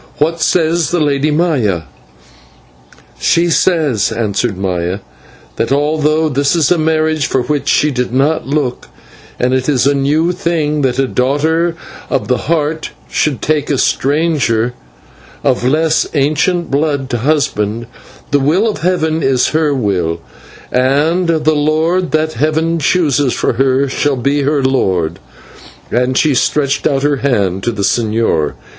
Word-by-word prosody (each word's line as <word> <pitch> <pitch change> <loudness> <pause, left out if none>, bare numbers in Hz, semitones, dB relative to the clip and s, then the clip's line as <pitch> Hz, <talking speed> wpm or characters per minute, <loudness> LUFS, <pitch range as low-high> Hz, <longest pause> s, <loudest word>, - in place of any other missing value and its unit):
What 165 +2 0
says 165 -1 +1
the 175 - 0
Lady 145 -1 +1
Maya?" 140 - 0 1.4
"She 170 0 +2
says," 150 - +1
answered 110 -1 -1
Maya, 90 0 -2 0.6
"that 115 - -1
although 155 +2 +1
this 140 +2 +1
is 160 -2 +2
a 175 - +3
marriage 155 -1 +1
for 130 - 0
which 150 0 -2
she 150 +1 +2
did 125 -2 -2
not 140 +5 0
look, 140 -3 -2 0.5
and 125 +1 +1
it 130 +2 0
is 135 -4 +2
a 140 - +3
new 150 +5 +1
thing 165 -5 -1
that 130 -3 0
a 135 -1 +1
daughter 160 +7 0 0.3
of - - -2
the - - -1
Heart 160 -1 -1 0.2
should 150 -4 -1
take 155 -1 0
a 145 - +1
stranger 135 -6 +1 0.7
of 130 -3 +1
less 160 +3 +1
ancient 155 +5 0
blood 140 -1 0
to 120 - -1
husband, 115 -5 0 0.5
the 145 - +3
will 165 +11 +2
of 215 - -2
Heaven 160 -2 0
is 135 -3 +2
her 155 -1 +1
will, 95 -10 -1 0.5
and 145 +8 +1
the 155 -1 +2
lord 160 +4 +1
that 155 0 0
Heaven 160 +5 0
chooses 145 -5 +1
for - - 0
her 135 +2 +1
shall 140 +1 0
be 140 +4 0
her 140 0 0
lord" 95 -11 0 0.7
and 125 +2 +1
she 155 -3 +3
stretched 140 +2 +1
out 135 0 0
her 145 -1 +1
hand 100 -9 0
to 120 - -1
the 105 -3 -4
señor. 110 -9 0
145 Hz, 150 wpm, -14 LUFS, 125-155 Hz, 1.4 s, a